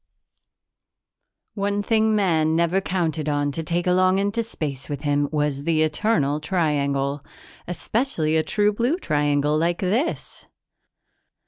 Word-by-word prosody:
One 205 0 -1
thing 220 0 +2
Man 160 -6 +2
never 170 +3 +2
counted 160 -5 -1
on 145 -1 0
to 165 - -4
take 170 +2 -2
along 185 +1 +3
into 200 +4 0
space 145 - -5
with 145 -2 -4
him 145 -1 0
was 150 -2 -1
the 155 0 +2
Eternal 150 -3 +1
Triangle 145 -4 -1 0.4
especially 175 - -1
a 160 - +4
true 210 +5 +1
blue 240 +10 0
triangle 145 - +1
like 170 +2 +1
this! 220 - -2
160 Hz, 125 wpm, -23 LUFS, 145-200 Hz, 0.4 s, a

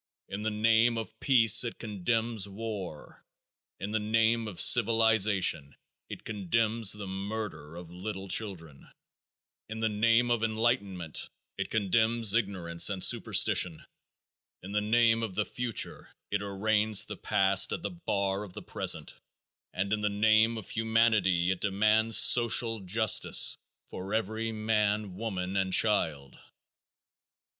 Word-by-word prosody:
In 100 - -6
the 110 - -2
name 115 +2 +2
of 110 0 -8
peace 115 -5 +5
it 120 - -6
condemns 110 0 -3
war. 100 -6 -8 0.6
In 100 +2 -6
the 110 - -1
name 115 +1 0
of 95 -5 -8
civilization 110 -9 +3 0.3
it - - -9
condemns 110 +2 0
the 105 -1 -8
murder 95 -5 -7
of 85 -1 -11
little 95 +2 -7
children. 85 -9 -4 0.8
In 110 0 -7
the 110 0 0
name 115 +3 +1
of 120 -2 0
enlightenment 110 -7 -2 0.3
it - - -5
condemns 110 +1 +1
ignorance 95 -7 0
and 95 -2 -3
superstition. 80 -3 +2 0.8
In 95 - -9
the 105 0 -1
name 115 +1 +2
of 110 -5 -5
the 105 - -1
future 120 -3 -4 0.2
it 105 0 -1
arraigns 105 +1 0
the - - -8
past 100 -2 +2
at 170 - -5
the - - -4
bar 100 - -3
of 100 -4 -12
the - - -9
present, - - -2 0.6
and 100 +3 -3
in 105 - -2
the 105 - 0
name 110 +2 +2
of 110 - -9
humanity 110 -6 +1
it 95 - -4
demands 110 +3 +2
social 115 -1 +4
justice 105 +3 +3 0.4
for 95 +3 -6
every 110 +1 -3
man, 105 -2 -2
woman 95 -3 -5
and 95 -1 -1
child. 80 -11 0
105 Hz, 135 wpm, -28 LUFS, 95-115 Hz, 0.8 s, peace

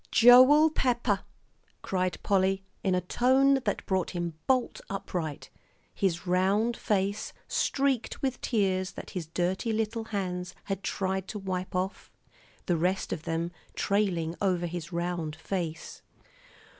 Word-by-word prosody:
"Joel 255 +6 +8
Pepper!" 240 -8 +1 0.6
cried 185 -1 -1
Polly, 195 -1 +2 0.2
in 190 -2 +2
a 180 - +1
tone 265 +8 +3
that 205 - -1
brought 190 -2 0
him 175 -2 -3
bolt 255 -2 +1
upright, 175 -6 -4 0.4
his 185 -1 -1
round 195 +6 +2
face 200 -1 -1
streaked 270 -4 0
with 265 -2 -2
tears 190 -5 0
that - - -8
his 175 -5 -4
dirty 185 +7 -1
little 220 +1 -1
hands 180 -4 -3
had 195 -1 -3
tried 190 -1 -2
to 210 - -5
wipe 185 -2 -4
off, 185 +2 -3 0.5
the 175 - +1
rest 180 +4 0
of 160 - -6
them 165 +1 -1 0.2
trailing 185 -6 0
over 180 -3 +1
his 170 -1 -5
round 170 -3 -2
nose. 170 -4 -3
190 Hz, 130 wpm, -29 LUFS, 180-220 Hz, 0.6 s, Joel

